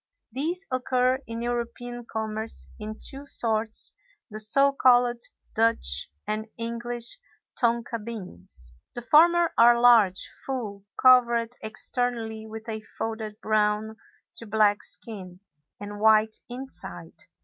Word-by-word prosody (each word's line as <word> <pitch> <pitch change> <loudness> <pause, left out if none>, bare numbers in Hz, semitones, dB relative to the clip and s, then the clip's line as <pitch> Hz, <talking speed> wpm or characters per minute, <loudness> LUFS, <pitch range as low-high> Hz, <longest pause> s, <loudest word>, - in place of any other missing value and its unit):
These 330 - -1
occur 255 0 +1
in 230 +1 -5
European 240 0 -4
commerce 220 0 -4
in 215 0 -6
two 280 +1 -3
sorts, 220 -3 +2 0.4
the 215 - -4
so 275 +6 +6
called 245 -3 +3 0.3
Dutch 220 - +1 0.2
and 215 +1 -2
English 235 - -2 0.4
tonka 235 -2 0
beans; 90 - -9 0.2
the 240 - -6
former 340 +5 +5
are 235 +1 +6
large, 225 -6 +5 0.2
full, 210 -7 -5
covered 240 -2 +4
externally 220 0 -3
with 220 +1 -9
a 220 -1 -4 0.2
folded 220 -1 -5
brown 215 0 0 0.4
to 230 - -7
black 210 -1 +2
skin, 185 -5 -6 0.4
and 205 0 -8
white 220 0 +4
inside. 260 +2 -8
230 Hz, 115 wpm, -26 LUFS, 215-245 Hz, 0.4 s, so